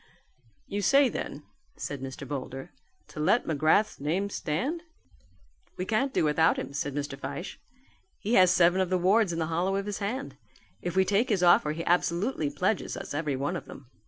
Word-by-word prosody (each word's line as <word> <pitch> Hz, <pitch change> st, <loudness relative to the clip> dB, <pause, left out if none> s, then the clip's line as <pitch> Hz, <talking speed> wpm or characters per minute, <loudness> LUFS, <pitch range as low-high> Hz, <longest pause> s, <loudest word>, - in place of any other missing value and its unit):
"You 205 Hz, +1 st, -3 dB
say 275 Hz, +6 st, +5 dB
then," 150 Hz, -8 st, -5 dB, 0.3 s
said 140 Hz, -2 st, -5 dB
Mr. 135 Hz, +1 st, -7 dB
Boulder, 135 Hz, +3 st, -6 dB, 0.4 s
"to -, -, -9 dB
let 185 Hz, +10 st, +3 dB
McGrath's 160 Hz, +7 st, +2 dB
name 180 Hz, +8 st, -1 dB
stand." 255 Hz, -, -2 dB, 1.0 s
"We 185 Hz, -, -2 dB
can't 240 Hz, +7 st, 0 dB
do -, -, +1 dB
without 155 Hz, +2 st, +3 dB
him," -, -, -5 dB
said 145 Hz, -1 st, -3 dB
Mr. 145 Hz, -1 st, -3 dB
Fyshe, 170 Hz, +6 st, -6 dB, 0.6 s
"he 220 Hz, -, -3 dB
has 185 Hz, -5 st, +7 dB
seven 180 Hz, +1 st, +4 dB
of 185 Hz, -, 0 dB
the 185 Hz, -, +2 dB
wards 190 Hz, +2 st, +3 dB
in 165 Hz, -, -3 dB
the 165 Hz, -, 0 dB
hollow 185 Hz, +4 st, +1 dB
of 195 Hz, 0 st, -2 dB
his 205 Hz, -1 st, -4 dB
hand. 240 Hz, +7 st, -4 dB, 0.4 s
If 175 Hz, 0 st, -4 dB
we 190 Hz, 0 st, +4 dB
take 205 Hz, +7 st, +2 dB
his 195 Hz, -5 st, +1 dB
offer 175 Hz, -3 st, +5 dB
he 165 Hz, +1 st, -5 dB
absolutely 175 Hz, -, +1 dB
pledges 185 Hz, +8 st, -1 dB
us -, -, -6 dB
every 145 Hz, -2 st, -1 dB
one 140 Hz, +7 st, -2 dB
of 170 Hz, -, -5 dB
them." 130 Hz, -2 st, -12 dB
175 Hz, 190 wpm, -28 LUFS, 150-200 Hz, 1.0 s, has